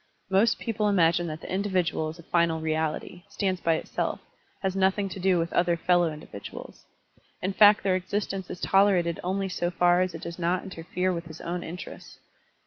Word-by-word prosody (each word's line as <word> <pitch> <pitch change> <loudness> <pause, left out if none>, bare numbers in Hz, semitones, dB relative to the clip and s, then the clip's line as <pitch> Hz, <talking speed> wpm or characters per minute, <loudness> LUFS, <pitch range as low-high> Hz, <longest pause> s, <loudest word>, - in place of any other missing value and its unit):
Most 205 +4 +4
people 215 -2 -1
imagine 170 -3 +3
that 155 +1 -6
the - - -6
individual 185 -5 0
is 160 - -9
a 170 - -13
final 170 -1 +1
reality, 160 +2 -2
stands 190 -3 -1
by 165 -1 +2
itself, - - -3 0.4
has 190 -1 0
nothing 195 +1 +1
to 190 - -7
do 185 -1 +3
with 170 0 -1
other 170 -1 +2
fellow 175 -1 +2
individuals; 150 -9 -10 0.5
in 190 +2 -2
fact 210 +1 +6
their 190 -2 +2
existence 190 0 -3
is 180 - -6
tolerated 190 -4 +3
only 190 +2 -1
so 175 -2 -1
far 175 0 +3
as 185 -2 -1
it - - -8
does 170 +1 -7
not 175 +1 0
interfere 180 0 -2
with 170 0 -4
his 160 -1 -10
own 175 +1 -3
interests. 175 +2 -9
180 Hz, 185 wpm, -27 LUFS, 170-190 Hz, 0.5 s, fact